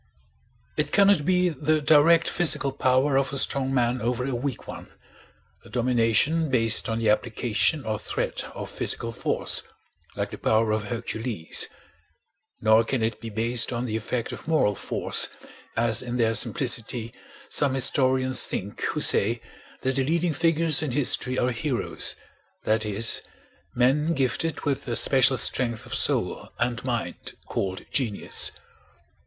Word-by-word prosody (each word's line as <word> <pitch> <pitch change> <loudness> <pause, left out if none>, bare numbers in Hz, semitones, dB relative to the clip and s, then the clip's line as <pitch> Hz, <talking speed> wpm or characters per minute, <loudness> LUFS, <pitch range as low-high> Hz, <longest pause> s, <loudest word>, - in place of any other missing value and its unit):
It - - -1
cannot 200 -6 +4
be 180 -1 +3
the 155 0 0
direct 155 +2 +4
physical 155 -5 +1
power 135 +1 +1
of 135 0 0
a 140 - -3
strong 135 0 +1
man 125 -1 0
over 125 +2 -1
a 135 - -3
weak 125 +1 -4
one—a - - -15
domination 125 +6 +1
based 115 -4 +3
on 115 - -1
the 110 -2 +2
application 115 +4 0
or 110 -1 -2
threat - - -4
of - - -7
physical 115 - -1
force, - - 0 0.5
like - - -3
the - - -8
power 110 0 +1
of 110 0 -1
Hercules; 115 -4 -2 0.9
nor 110 +1 +4
can 120 0 -2
it 110 -1 -2
be 115 - -6
based 115 +3 +1
on 120 0 -3
the 110 -3 -3
effect 115 +2 -3
of - - -9
moral 155 -10 +2
force, - - 0 0.5
as 115 -1 +1
in 125 -1 -4
their 115 -2 +2
simplicity 115 -1 -1 0.3
some 140 -2 +2
historians 130 0 +3
think 100 +2 -5
who - - -2
say 115 +4 +2 0.4
that 130 0 0
the 135 - +2
leading 165 +3 0
figures 165 -1 +2
in 155 - -2
history 130 -1 +1
are 125 0 +1
heroes, 125 +1 -3 0.5
that 110 0 0
is, 105 +2 +1 0.5
men 145 +7 +2
gifted 135 +4 -1
with 140 -2 -3
a 120 - -2
special 130 +1 +5
strength 120 -3 +1
of - - -8
soul - - 0
and 120 -1 -2
mind 120 -3 -4
called 95 -1 -4
genius. 115 -7 0
125 Hz, 150 wpm, -25 LUFS, 115-140 Hz, 0.9 s, special